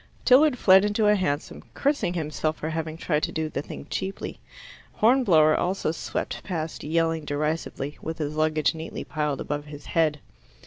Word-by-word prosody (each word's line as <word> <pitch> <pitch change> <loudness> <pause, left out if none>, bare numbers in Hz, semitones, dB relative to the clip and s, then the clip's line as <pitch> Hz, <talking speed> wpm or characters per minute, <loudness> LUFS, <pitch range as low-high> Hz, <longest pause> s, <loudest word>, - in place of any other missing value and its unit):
Tilliard 275 +1 +6
fled 190 -3 +6
into 210 +1 +1
a 210 - +6
hansom, 150 -6 -2
cursing 280 -11 0
himself 155 -1 -2
for 155 - -4
having 160 0 -3
tried 155 -2 0
to - - -1
do 160 -1 -2
the - - -3
thing 145 - -9
cheaply. 195 +1 -4 0.5
Hornblower 200 -11 +4
also 180 -2 0
swept 160 - -4
past 165 -4 -4
yelling 165 0 0
derisively, 150 -1 -3
with 160 0 -5
his 150 -2 -3
luggage 155 -2 +2
neatly 160 0 -6
piled 150 -3 -2
above 145 0 -3
his 145 -1 -10
head. 155 -3 +2
160 Hz, 165 wpm, -25 LUFS, 150-185 Hz, 0.5 s, Tilliard